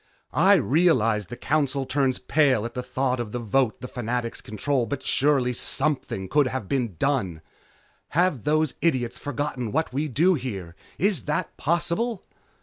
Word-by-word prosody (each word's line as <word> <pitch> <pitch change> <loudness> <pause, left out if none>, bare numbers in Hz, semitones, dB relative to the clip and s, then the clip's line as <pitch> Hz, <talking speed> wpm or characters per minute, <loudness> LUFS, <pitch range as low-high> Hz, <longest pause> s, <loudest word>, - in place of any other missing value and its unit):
I 190 +6 +6
realize 130 - +2
the 120 - -8
Council 140 -2 0
turns 135 -1 +1
pale 135 -8 +2
at 120 - -5
the 125 - -3
thought 130 0 -1
of 115 -3 -4
the - - -1
vote 120 +1 0
the 125 - -5
Fanatics 120 -1 -3
control, 120 +4 -1
but 140 - -4
surely 135 -3 +2
something 135 -7 -1
could 145 +6 +3
have 130 -6 -4
been 120 -7 -1
done! 95 - -1 0.8
Have 175 - +2
those 155 -1 +2
idiots 130 -8 0
forgotten 145 -4 -3
what 160 -1 -1
we 145 +4 -1
do 160 +8 +3
here? 100 - -5 0.2
Is 195 -2 +1
that 150 - -2
possible?" 175 +7 -1
135 Hz, 155 wpm, -25 LUFS, 120-150 Hz, 0.8 s, I